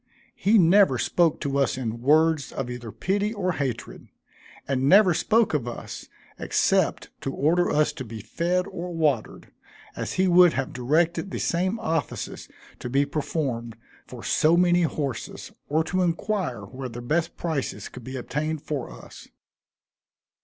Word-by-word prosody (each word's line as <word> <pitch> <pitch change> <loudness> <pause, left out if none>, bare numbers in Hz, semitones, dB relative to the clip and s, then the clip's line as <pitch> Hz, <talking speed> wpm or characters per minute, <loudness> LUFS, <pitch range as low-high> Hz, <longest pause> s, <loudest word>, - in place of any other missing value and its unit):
He 215 +3 +3
never 185 -5 +5
spoke 160 +6 +2
to 140 -1 -1
us 135 -2 +1
in 115 -2 -4
words 155 +2 +3
of 125 -2 -4
either 120 -2 -7
pity 205 - -1
or 185 -3 0
hatred; 135 -8 -4 0.6
and 135 0 +1
never 195 -1 +7
spoke 220 +6 +2
of 135 -5 -1
us, 120 - -7 0.3
except - - +1
to 135 - -3
order 170 +6 +2
us 150 0 +2
to 145 -4 -6
be 115 -2 -8
fed 175 - -1
or 180 -1 -6
watered, 150 -8 -1 0.4
as - - -4
he 190 0 +2
would 180 -1 +6
have 135 0 -3
directed 160 +9 +1
the - - -4
same 185 +6 0
offices 160 - -3 0.3
to 125 - -5
be 140 +3 +2
performed 135 -6 -3 0.3
for - - -10
so 160 +2 +3
many 175 0 +4
horses, 145 -6 -3 0.2
or 155 +2 +2
to 185 +3 -1
inquire 175 - -1
where 130 +6 -7
the 120 +1 -8
best 160 +6 -1
prices 160 -6 -3
could 125 - -11
be 130 +3 -7
obtained 150 +5 -3
for 145 -4 -4
us. - - -12
155 Hz, 155 wpm, -25 LUFS, 130-175 Hz, 0.6 s, never